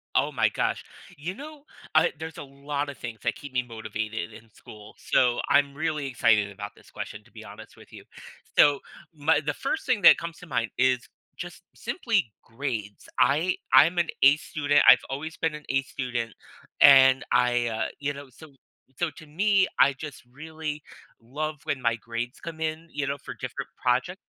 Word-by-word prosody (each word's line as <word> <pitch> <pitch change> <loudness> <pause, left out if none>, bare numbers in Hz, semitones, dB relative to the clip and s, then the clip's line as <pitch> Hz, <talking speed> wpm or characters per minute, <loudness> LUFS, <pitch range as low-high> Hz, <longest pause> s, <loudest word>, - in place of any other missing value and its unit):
Oh - - +2
my - - +2
gosh. - - -1 0.3
You 170 +6 -5
know, 295 +3 -10 0.3
uh, - - +5
there's 160 +1 -7
a - - -6
lotta 140 +1 -4
things 115 -3 -7
that - - 0
keep 145 -2 -10
me 125 -1 +1
motivated 110 -1 -5
in 115 +1 -14
school. 105 0 -14
So 125 -2 +2
I'm 140 -1 +3
really 155 -1 -2
excited 115 -5 +2
about 100 +1 -7
this - - -19
question - - -7
to - - -23
be - - -11
honest - - -12
with - - -17
you. - - -12 0.5
So 145 -1 +6 0.4
m 145 +2 -3 0.2
the 150 - 0
first 275 +4 -3
thing 240 -5 +1
that - - +9
comes 170 0 -7
to 180 - -12
mind 120 -5 -1
is 125 0 +3 0.4
just - - -9
simply 115 - -1
grades. 115 -4 -5
I 150 +8 +3 0.2
I'm 170 +4 +6
an 170 -1 +2 0.2
A 140 +2 +7
student. 145 -2 +1
I've - - +9
always 150 +4 -5
been 160 -1 -1
an 150 - -10
A 135 0 +2
student, 125 -4 -4 0.5
and 135 -1 +7
I, 120 -1 +3
uh, 110 -1 -1
you 145 0 -2
know, 140 -1 -10
so 145 +3 -15 0.4
so 175 - 0
to 155 - -11
me, 195 +5 +2
I 140 - +6
just 145 0 -9
really 155 +1 -6 0.4
love 150 +6 -4
when 145 -4 -2
my 115 -1 +2
grades 115 +2 -5
come 165 -1 -8
in, 160 +1 -3
you 145 -1 -2
know, 140 +1 -2
for 135 - -9
different - - -6 0.2
projec 130 +9 +1
140 Hz, 185 wpm, -26 LUFS, 120-155 Hz, 0.5 s, that